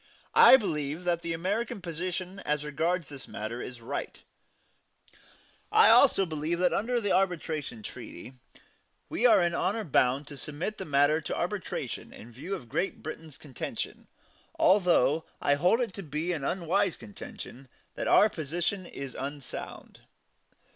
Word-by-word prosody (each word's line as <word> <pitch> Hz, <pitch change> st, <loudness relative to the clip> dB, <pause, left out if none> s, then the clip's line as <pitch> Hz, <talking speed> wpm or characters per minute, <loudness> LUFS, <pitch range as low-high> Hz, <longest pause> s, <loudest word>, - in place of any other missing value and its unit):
I 265 Hz, -, +9 dB
believe 155 Hz, -, -3 dB
that 175 Hz, -1 st, 0 dB
the 170 Hz, -, -4 dB
American 195 Hz, +7 st, -2 dB
position 180 Hz, +2 st, -4 dB
as 150 Hz, -4 st, -2 dB
regards 165 Hz, +4 st, 0 dB
this 140 Hz, -2 st, -9 dB
matter 110 Hz, +3 st, -5 dB
is 125 Hz, -2 st, -8 dB
right; 115 Hz, -, -5 dB, 0.9 s
but -, -, -27 dB, 0.6 s
I -, -, +8 dB
also 195 Hz, -, +6 dB
believe 160 Hz, +1 st, -2 dB
that 180 Hz, 0 st, +2 dB
under 240 Hz, +4 st, +1 dB
the 205 Hz, -4 st, -1 dB
arbitration 160 Hz, -, -1 dB
treaty 125 Hz, -, -9 dB, 0.8 s
we 245 Hz, -, +3 dB
are 225 Hz, -, +6 dB
in 170 Hz, 0 st, +1 dB
honor 210 Hz, +5 st, 0 dB
bound 135 Hz, -4 st, +2 dB
to 145 Hz, -, -9 dB
submit 155 Hz, +10 st, -5 dB
the 190 Hz, -, -4 dB
matter 145 Hz, +2 st, +3 dB
to -, -, -4 dB
arbitration -, -, -4 dB
in 120 Hz, -, -12 dB
view 155 Hz, -, -5 dB
of 125 Hz, -10 st, -9 dB
Great 170 Hz, +10 st, -2 dB
Britain's 155 Hz, -1 st, -8 dB
contention 135 Hz, -5 st, -6 dB, 0.5 s
although 175 Hz, -5 st, +4 dB, 0.2 s
I 145 Hz, -, +3 dB
hold 180 Hz, -, +3 dB
it 235 Hz, -6 st, -2 dB
to 195 Hz, -, -6 dB
be 155 Hz, +1 st, -3 dB
an 155 Hz, -5 st, -3 dB
unwise 185 Hz, +4 st, 0 dB
contention 120 Hz, +4 st, -10 dB, 0.3 s
that -, -, -4 dB
our 210 Hz, -, +7 dB
position 175 Hz, +2 st, -3 dB
is 135 Hz, -2 st, -7 dB
unsound. 140 Hz, 0 st, -7 dB
165 Hz, 150 wpm, -29 LUFS, 145-185 Hz, 0.9 s, I